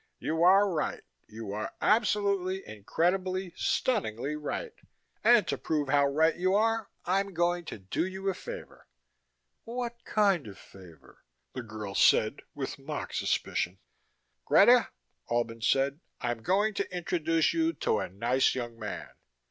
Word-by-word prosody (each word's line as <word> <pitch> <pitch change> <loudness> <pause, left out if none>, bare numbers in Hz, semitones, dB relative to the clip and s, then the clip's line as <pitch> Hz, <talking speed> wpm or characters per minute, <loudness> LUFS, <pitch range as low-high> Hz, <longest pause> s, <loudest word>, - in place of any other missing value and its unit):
"You 160 +1 -2
are 195 +4 +6
right. 165 -6 -2 0.2
You 110 -1 -7
are 105 +1 -4
absolutely, 200 -4 +1
incredibly, 180 - -1
stunningly 145 - -1
right. 295 - -4 0.5
And 235 0 +5
to - - -2
prove 150 -3 -1
how 140 0 +4
right 160 +4 +2
you 185 +2 +1
are 225 0 +1 0.2
I'm 195 +1 0
going 175 +1 +1
to - - -6
do 95 - -2
you 190 +1 -6
a 195 - +2
favor." - - -9 0.8
"What 235 0 -5
kind 195 - +2
of 100 - -10
favor?" 85 -7 -16 0.3
the 130 - -4
girl 110 -3 -7
said 110 +6 +4
with 140 -1 -5
mock 145 +2 -5
suspicion. 90 +2 -1 0.7
"Greta," - - +6 0.4
Albin 115 -1 -1
said, 135 +5 +2 0.2
"I'm 120 -2 -2
going 205 - +2
to 200 - -3
introduce 165 -2 +1
you 330 0 +2
to 110 - 0
a - - -3
nice 120 +8 +1
young 120 -2 -5
man." 105 -3 -6
160 Hz, 140 wpm, -29 LUFS, 120-195 Hz, 0.8 s, are